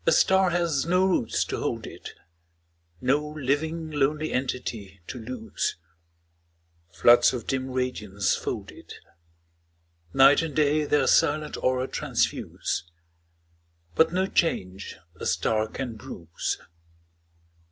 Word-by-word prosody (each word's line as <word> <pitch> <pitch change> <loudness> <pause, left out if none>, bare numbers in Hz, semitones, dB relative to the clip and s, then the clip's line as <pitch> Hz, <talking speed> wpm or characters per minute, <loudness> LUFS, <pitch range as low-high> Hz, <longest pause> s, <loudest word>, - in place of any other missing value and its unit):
A - - +6
star 190 +3 +4
has 170 -6 0
do 180 +2 +3
roots 180 -11 +1
to - - -3
hold - - -2
it, - - -10 0.9
No 140 +4 +2
living 155 +4 -1
lonely 150 +2 0
entity 115 -6 -3
to 125 - -7
lose. 115 0 -3 1.2
Floods 120 +10 +5
of 125 - -4
dim 130 0 -2
radiance 105 -7 -1
fold - - -4
it; - - -12 1.2
Night 135 +3 +6
and 160 -4 -4
day 150 0 +3
their 145 0 +2
silent 150 0 +2
aura 130 0 0
transfuse, - - -1 1.1
But 160 - +4
no 185 +2 +1
change 95 - -1 0.2
a - - -7
star 110 +5 +1
oan 120 0 -5
bruise. 85 -5 -5
135 Hz, 115 wpm, -26 LUFS, 115-155 Hz, 1.2 s, A